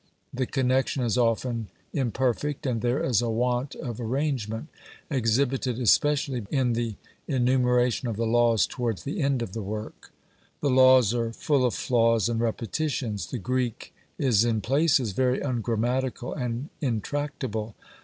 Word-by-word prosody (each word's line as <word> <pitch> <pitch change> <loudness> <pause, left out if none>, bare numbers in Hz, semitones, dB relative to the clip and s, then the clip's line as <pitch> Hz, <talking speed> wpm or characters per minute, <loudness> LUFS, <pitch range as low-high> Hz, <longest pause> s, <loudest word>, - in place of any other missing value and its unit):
The 130 -1 -1
connection 130 0 +1
is 115 -2 +1
often 115 -1 0 0.3
imperfect; 130 +3 -1
and 120 -4 -1
there 125 +6 0
is 120 -9 +2
a 120 - -1
want 125 +3 0
of 120 -1 -6
arrangement, 120 -1 -2 0.4
exhibited 125 0 +1
especially 135 +1 +2
in 130 -4 +1
the 115 -2 -2 0.3
enumeration 125 -2 +2
of 110 -3 -3
the 115 - 0
laws 115 -2 +3
towards 115 -5 -3
the 155 +6 -3
end 135 -3 +1
of 95 - -7
the 115 - -4
work. 105 +2 -7 0.5
The 145 - +1
Laws 130 -3 +6
are 115 -1 -1
full 140 +3 +1
of 120 -6 +1
flaws 115 -3 +2
and 115 -1 -1
repetitions. 115 -1 -2
The 125 - -4
Greek 125 +1 -2 0.2
is 115 -6 +3
in 115 -2 +1
places 135 -3 +2
very 130 +5 +1
ungrammatical 125 0 -1
and 125 +1 -3
intractable. 120 -3 -3
125 Hz, 145 wpm, -26 LUFS, 115-130 Hz, 0.5 s, Laws